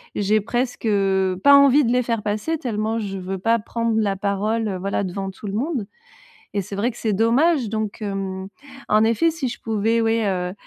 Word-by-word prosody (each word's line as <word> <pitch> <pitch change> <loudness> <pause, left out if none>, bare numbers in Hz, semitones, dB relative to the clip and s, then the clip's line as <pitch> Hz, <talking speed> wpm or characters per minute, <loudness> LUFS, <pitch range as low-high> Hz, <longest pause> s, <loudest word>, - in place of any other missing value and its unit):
j'ai 210 +1 +2
presque, 240 +3 -2
heu, 190 -3 +1
pas 280 0 +8
envie 280 +1 +6
de 235 - +1
les 250 0 +3
faire 230 -3 -2
passer 215 +11 -1
tellement 225 -3 -2
je 195 -2 -4
veux 190 +1 -4
pas 230 +4 +2
prendre 230 +1 -1
la 200 -2 0
parole, 205 +3 -1
heu, 195 -3 -3
voilà, 200 +2 -2
devant 195 +1 -4
tout 200 - -13
le 195 - -4
monde. 255 0 -2 0.7
Et 200 - +1
c'est 195 - -7
vrai 220 +5 0
que 240 - -15
c'est 220 -2 -1
dommage 245 - +2
donc 220 0 -3
hem. 195 -2 -4 0.4
En 215 +1 +4
effet, 230 +9 +2
si 310 -5 -3
je 240 - -6
pouvais 225 +1 0
ouais, 225 0 +1
heu, 180 -2 -2
215 Hz, 210 wpm, -22 LUFS, 195-230 Hz, 0.7 s, pas